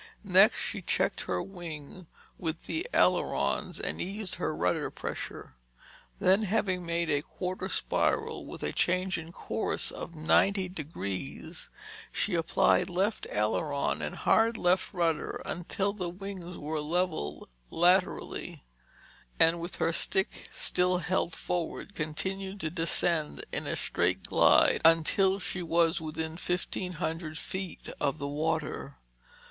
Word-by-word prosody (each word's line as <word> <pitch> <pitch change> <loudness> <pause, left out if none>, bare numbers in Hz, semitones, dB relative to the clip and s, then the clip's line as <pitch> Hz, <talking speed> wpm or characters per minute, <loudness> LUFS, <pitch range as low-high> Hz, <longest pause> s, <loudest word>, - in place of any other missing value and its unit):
Next, - - +6
she - - -2
checked - - 0
her 90 -1 -1
wing 170 -2 -8 0.3
with 165 -1 -3
the 330 +7 -2
ailerons - - +2
and - - -3
eased 195 0 -2
her 80 - 0
rudder 90 +2 +1
pressure. - - -6 0.7
Then 190 +3 +4
having 195 -3 0
made 170 -1 0
a 145 0 +2
quarter 185 +4 -4
spiral - - +1
with - - -8
a - - 0
change 185 0 +1
in 165 +1 -9
course - - -2
of 170 - -7
90 185 +4 +3
degrees, 100 - -5 0.4
she 205 - -1
applied 165 +2 +3
left 195 +5 0
aileron 125 +8 0
and - - -3
hard 225 +1 +3
left 180 -1 +2
rudder 170 -4 0
until 195 +3 -1
the 180 -4 -3
wings 180 -1 -7
were 155 +1 -3
level 165 - -1 0.2
laterally, 180 - +1 0.8
and 165 +1 +5
with 175 +1 -4
her 165 - +1
stick 190 +3 0
still 180 0 +1
held 180 -2 0
forward, 175 +4 -3
continued 190 +5 -3
to 155 - -2
descend 165 -2 0
in - - -3
a - - 0
straight - - 0
glide - - +5
until 165 +4 +5
she 185 -2 -3
was 165 -1 +2
within 160 +1 -4
fifteen 180 +1 -2
hundred 160 -1 -3
feet 185 +2 -5
of 145 +1 +1
the 140 -2 -3
water. 150 -1 -2
170 Hz, 130 wpm, -30 LUFS, 160-185 Hz, 0.8 s, Next